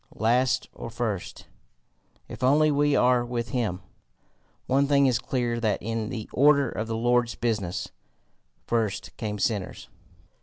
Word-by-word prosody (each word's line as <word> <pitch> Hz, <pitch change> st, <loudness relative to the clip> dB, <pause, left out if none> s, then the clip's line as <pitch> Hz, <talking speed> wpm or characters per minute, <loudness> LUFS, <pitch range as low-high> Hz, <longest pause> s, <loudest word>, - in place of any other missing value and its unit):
Last 125 Hz, +3 st, +1 dB
or -, -, -7 dB
first 110 Hz, -5 st, -4 dB, 0.8 s
if -, -, -10 dB
only 150 Hz, +4 st, +4 dB
we 145 Hz, 0 st, +2 dB
are 125 Hz, -1 st, +3 dB
with 120 Hz, -1 st, -4 dB
him! 105 Hz, -8 st, -2 dB, 0.8 s
One 140 Hz, +2 st, +2 dB
thing 140 Hz, -1 st, +4 dB
is 125 Hz, -4 st, +2 dB
clear 120 Hz, -2 st, -2 dB
that 110 Hz, -2 st, 0 dB
in 115 Hz, 0 st, -3 dB
the 110 Hz, -3 st, -5 dB
order 140 Hz, -1 st, +4 dB
of 110 Hz, -, -4 dB
the 115 Hz, -1 st, -2 dB
Lord's 120 Hz, 0 st, +1 dB
business, 95 Hz, -6 st, -2 dB, 0.8 s
first 110 Hz, -4 st, -2 dB
came 105 Hz, -2 st, -3 dB
sinners. 100 Hz, -2 st, -2 dB
120 Hz, 140 wpm, -26 LUFS, 110-130 Hz, 0.8 s, only